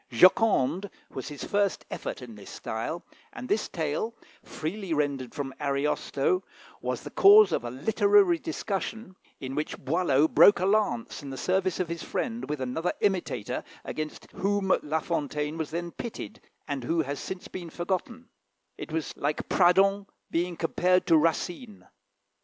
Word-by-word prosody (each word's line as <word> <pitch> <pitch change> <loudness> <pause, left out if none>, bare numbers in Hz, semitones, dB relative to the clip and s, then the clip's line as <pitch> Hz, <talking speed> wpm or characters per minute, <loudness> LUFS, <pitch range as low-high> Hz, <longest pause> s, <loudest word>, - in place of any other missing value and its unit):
"Joconde" 185 - +4 0.2
was 130 - -6
his 145 -3 -7
first 200 -2 0
effort - - -5
in 120 -2 -9
this 105 -2 -12
style; 115 +10 -4 0.3
and 250 - -7
this 215 -1 +1
tale, 160 +8 -2 0.3
freely 175 +2 -4
rendered 140 -4 -1
from 140 -3 -4
Ariosto, 150 - 0 0.4
was - - -3
the - - -8
cause 415 +2 +8
of - - 0
a 120 - -4
literary 345 - +3
discussion, 220 - -4 0.2
in 130 -1 -5
which 150 +2 -3
Boileau 155 0 +2
broke 205 - +7
a 185 - +1
lance 200 - +1
in 140 - -8
the 135 - -6
service 185 +2 0
of 180 - 0
his 170 0 -5
friend 230 -6 -3
with 150 -2 -2
another 130 +7 -1
imitator 190 -3 -1 0.2
against 155 0 -6
whom 200 -1 +1
La 155 +1 -1
Fontaine 150 -2 -2
was 160 - -2
then 170 +1 -4
pitted, 225 0 -7 0.3
and 140 -4 -3
who 165 +6 +1
has 140 0 -4
since 190 -1 -6
been 175 -2 -7
forgotten: 190 +8 -3 0.5
it - - -7
was 160 -1 -3
like 145 +1 -2
Pradon 195 +2 +4 0.2
being 175 0 -1
compared 180 +2 +2
to 165 - +5
Racine. 175 +7 0
170 Hz, 155 wpm, -28 LUFS, 145-200 Hz, 0.5 s, cause